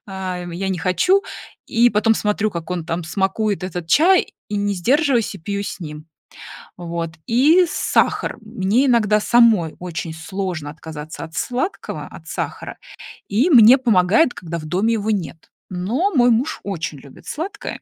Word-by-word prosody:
а, 190 -2 -5
я 190 +3 -3
не 185 -2 -2
хочу. 185 - +2 0.4
И 240 +1 +3
потом 220 +1 +3
смотрю, 210 0 0
как 170 -3 -7
он 175 -2 -3
там 170 +1 -3
смакует 195 +3 -1
этот 175 -2 -5
чай, 350 - +4 0.2
и 210 - -3
не 205 0 0
сдерживаюсь- 245 - +1
и - - -9
пью 200 +4 -4
с 200 - -6
ним. 150 -2 -8 0.7
Вот. 170 -1 -4 0.2
И 300 +10 +5
сахар. - - 0
Мне 220 +4 0
иногда 215 -4 +3
самой 220 -9 +4
очень 170 -2 -5
сложно 170 -2 -5
отказаться 155 0 -8
от 165 0 -10
сладкого, 255 +10 -3
от - - -13
сахара, - - -5 0.5
и 235 - +2
мне 245 -3 +8
помогает, 230 - +3
когда 170 -1 -6
в 155 - -8
доме 190 +9 0
его 220 -1 -1
нет. 175 -5 -4 0.2
Но 225 - -1
мой 245 -4 +4
муж 255 +8 0
очень 165 -7 -4
любит 135 0 -16
сладкое, 345 +7 -5
200 Hz, 160 wpm, -20 LUFS, 170-235 Hz, 0.7 s, мне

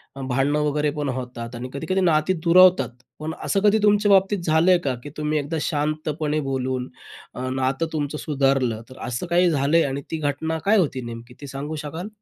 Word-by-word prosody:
अ, 135 - -7
भांडणं 135 +3 +1
वगैरे 150 0 +1
पण 145 -2 -1
होतात 125 -2 -5
आणि 125 +2 -6
कधी-कधी 185 +7 -1
नाती 165 0 +3
दुरावतात. 180 0 +6 0.3
पण 155 +1 -4
असं 200 - +1
कधी 210 +1 +5
तुमच्या 205 0 +4
बाबतीत 195 0 +4
झालंय 165 +3 +4
का 135 -3 0
की 145 - -7
तुम्ही 150 0 0
एकदा 145 +3 -3
शांतपणे 155 0 -1
बोलून 130 -1 -2 0.4
अ, 130 +1 -4
नातं 130 +4 0
तुमचं 150 -1 -2
सुधारलं. 135 -6 0
तर 130 - -13
असं 125 +7 -3
काही 175 +1 +3
झालंय 155 +2 +3
आणि 140 0 -2
ती 160 - -1
घटना 155 +2 -1
काय 210 +2 +4
होती 140 -8 0
नेमकी 120 +1 -9
ते 145 - -7
सांगू 140 +3 -5
शकाल? 165 +6 -5
150 Hz, 185 wpm, -23 LUFS, 135-165 Hz, 0.4 s, दुरावतात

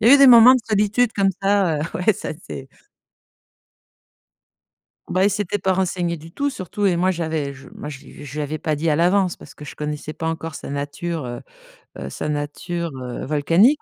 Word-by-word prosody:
Il 220 - +5
y 280 - +10
eu - - +6
des 275 - +8
moments 245 +1 +9
de 255 - +1
solitude 215 +3 +2
comme 195 -1 +3
ça. 195 -6 +2 0.2
Ouais, 185 +5 +3
ça, - - -5 0.2
c'est 135 0 -7 2.4
Bah, 185 +1 +1
il 205 - +5
s'était 205 0 -2
pas 190 0 +1
renseigné 175 -2 -1
du 165 +2 -13
tout, 285 +6 -1
surtout, 200 - -2
et 175 - +2
moi, 185 +2 +2
j'avais 160 -5 -2
je 135 0 -14
moi - - -6
je 140 -3 -8
lui 145 - -12
je 140 - -9
lui 150 - -1
avais 150 +2 -3
pas 155 -1 -1
dit 160 +3 0
à 150 - +3
l'avance 180 +2 +2
parce - - -13
que 150 - -12
je - - -9
connaissais 150 0 -4
pas 160 - -4
encore 165 -2 -4
sa - - -7
nature, 145 +2 -4
heu 120 -1 -6 0.6
heu, 70 0 -6
sa 150 - -4
nature, 165 +4 -3
heu, 125 -1 -6
volcanique. 165 - +3
170 Hz, 210 wpm, -22 LUFS, 150-200 Hz, 2.4 s, y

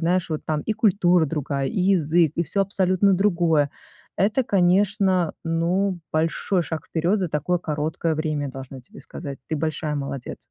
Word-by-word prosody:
знаешь, 175 +2 +1
вот 155 -2 -4
там 155 -1 -1
и 220 - -1
культура 185 -6 +3
другая, 140 -2 -2
и - - -3
язык, 175 -4 +3
и 170 - +1
всё 195 +5 0
абсолютно 195 0 +2
другое. 170 -6 +2 0.5
Это, 210 +7 +2
конечно, 190 -2 +2
ну, 175 +3 0
большой 165 +3 0
шаг 160 -1 -5
вперед 175 +6 0
за 180 - -1
такое 160 +4 0
короткое 155 0 -2
время, 150 -3 -2
должна 135 0 -9
тебе 125 - -16
сказать. 140 0 -8
Ты 160 - -2
большая 155 0 -2
молодец. 140 -3 -5
170 Hz, 160 wpm, -23 LUFS, 150-190 Hz, 0.5 s, культура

